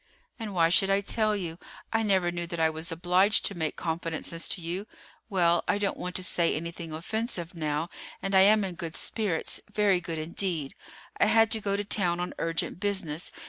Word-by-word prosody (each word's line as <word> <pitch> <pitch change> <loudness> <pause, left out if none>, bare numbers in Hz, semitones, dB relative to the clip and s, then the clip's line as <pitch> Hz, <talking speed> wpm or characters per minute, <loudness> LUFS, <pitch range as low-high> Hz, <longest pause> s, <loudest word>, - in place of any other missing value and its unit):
"And 215 -4 -5
why 165 -1 +4
should 195 +3 +3
I 195 0 +3
tell 215 +1 +1
you? 175 -4 -5 0.3
I 225 - +3
never 190 -5 +2
knew 175 0 -4
that 170 0 -5
I 160 0 +3
was 160 +1 -3
obliged 180 +5 +3
to 200 - 0
make 160 -2 -2
confidences 165 0 -2
to - - -1
you. 175 +5 -4 0.4
Well, 175 -4 +3
I - - +2
don't 205 -1 0
want 180 0 -5
to 185 - -1
say 170 -1 +2
anything 170 +1 -5
offensive 175 +2 -3
now; 155 -1 -2 0.3
and 195 - -3
I 190 - +7
am 210 +2 +6
in 190 -2 -3
good 165 -2 -6
spirits, 205 -8 0
very 205 -4 +3
good 165 -2 -4
indeed. 160 -2 -2 0.5
I - - +5
had 225 -1 +4
to 220 - +1
go 200 -1 0
to 205 - -1
town 180 -4 +1
on 180 - -3
urgent 165 +1 -2
business. 190 -6 -1
180 Hz, 200 wpm, -28 LUFS, 165-200 Hz, 0.5 s, I